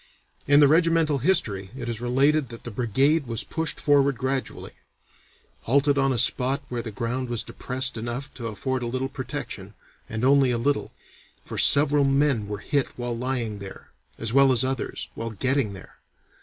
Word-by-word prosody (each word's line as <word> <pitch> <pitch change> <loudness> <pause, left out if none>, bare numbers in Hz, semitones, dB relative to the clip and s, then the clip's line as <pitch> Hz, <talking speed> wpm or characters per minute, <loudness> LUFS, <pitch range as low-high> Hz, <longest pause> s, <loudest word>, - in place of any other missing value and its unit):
In 145 +1 +6
the 145 - +7
regimental 165 -1 +3
history 115 - +1
it 120 -2 -6
is 115 -1 -4
related 135 +3 +2
that 115 -1 -10
the 120 - -7
brigade 135 +7 +1
was 115 -1 -2
pushed 160 -1 -3
forward 140 -2 +3
gradually, 130 +1 -3 0.9
"halted 140 +3 +3
on 135 0 +2
a 130 - 0
spot 130 +4 +1
where 120 -1 -3
the 115 - -6
ground 120 +4 -3
was 120 -2 0
depressed 130 +1 -2
enough 120 +5 -5
to 120 -3 -6
afford 125 +5 -3
a 120 - -3
little 130 +2 -2
protection, - - -6 0.3
and 110 +2 -2
only 135 -1 +4
a 120 - +1
little, 140 +5 -1 0.5
for - - -5
several 145 0 +5
men 135 -5 +2
were 105 0 -4
hit 140 +6 -1
while 120 -1 -3
lying 120 -4 -3
there, 100 -1 -11 0.3
as 115 0 -3
well 135 0 +6
as 125 -2 +3
others, 130 0 -3
while 115 0 -5
getting 130 0 0
there. 95 - -13
130 Hz, 175 wpm, -25 LUFS, 115-140 Hz, 0.9 s, the